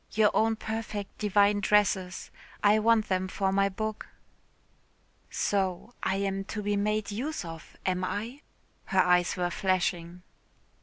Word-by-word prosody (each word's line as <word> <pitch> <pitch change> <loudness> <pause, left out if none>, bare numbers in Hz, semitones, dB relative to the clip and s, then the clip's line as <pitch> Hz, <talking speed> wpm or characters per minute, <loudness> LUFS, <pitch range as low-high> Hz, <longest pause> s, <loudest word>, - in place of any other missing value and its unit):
Your 215 0 +4
own 225 0 +2
perfect 220 -2 -5
divine 205 0 +3
dresses. 195 -3 +1 0.3
I 210 +1 +5
want 220 0 +3
them 185 0 0
for 190 +1 -1
my 195 0 +2
book." 215 +2 -4 1.2
"So 195 +3 -1
I 190 - 0
am 195 0 -1
to 210 +1 -5
be 205 0 0
made 210 +1 0
use 245 - -3
of, 165 -1 -10
am 185 -1 0
I?" 225 +9 -4 0.4
Her 190 - 0
eyes 180 0 +2
were 175 -1 0
flashing. 180 -1 -1
200 Hz, 140 wpm, -28 LUFS, 185-215 Hz, 1.2 s, I